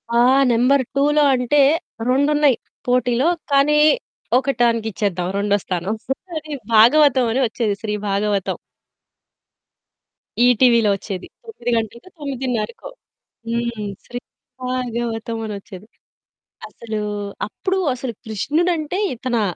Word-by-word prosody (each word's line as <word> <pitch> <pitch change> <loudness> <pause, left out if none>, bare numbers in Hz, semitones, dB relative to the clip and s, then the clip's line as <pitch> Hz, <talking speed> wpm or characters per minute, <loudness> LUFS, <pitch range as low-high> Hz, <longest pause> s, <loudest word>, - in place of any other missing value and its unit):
ఆ! - - +5 0.3
నంబర్ 255 +4 +3
2లో 295 +2 +3
అంటే 250 +4 +1 0.5
రెండున్నయి 285 0 +3 0.3
పోటీలో. 250 +3 +2 0.2
కానీ, 290 +2 +4 0.6
ఒకటానికి 240 -4 +1
ఇచ్చేద్దాం, 185 -3 -2
రెండో 205 0 +2
స్థానం 185 +4 -2 0.4
అది 305 -1 -6 0.2
భాగవతం 255 +3 +6
అని 265 - +1
వచ్చేది. 225 -2 -1
'శ్రీ 210 -1 -3 0.2
భాగవతం'. 200 -1 0 1.9
ఈటీవీలో 235 -3 +4
ఓచ్చేది. 195 -1 -6 0.2
తొమ్మిది 245 - -4
గంటలకో, 235 - -5
తొమ్మిదిన్నరకో 255 - -4 0.6
హ్మ్. 235 -3 -2 0.2
శ్రీ 245 - -6 0.4
భాగవతం 235 -2 -3
అనొచ్చేది. 200 -1 -8 0.8
అసలు 220 -2 -6 0.5
అప్పుడు 380 - -2 0.2
అసలు 250 -1 -5
కృష్ణుడంటే 310 - -1 0.2
ఇతనా! 235 -2 -1
240 Hz, 95 wpm, -20 LUFS, 215-275 Hz, 1.9 s, భాగవతం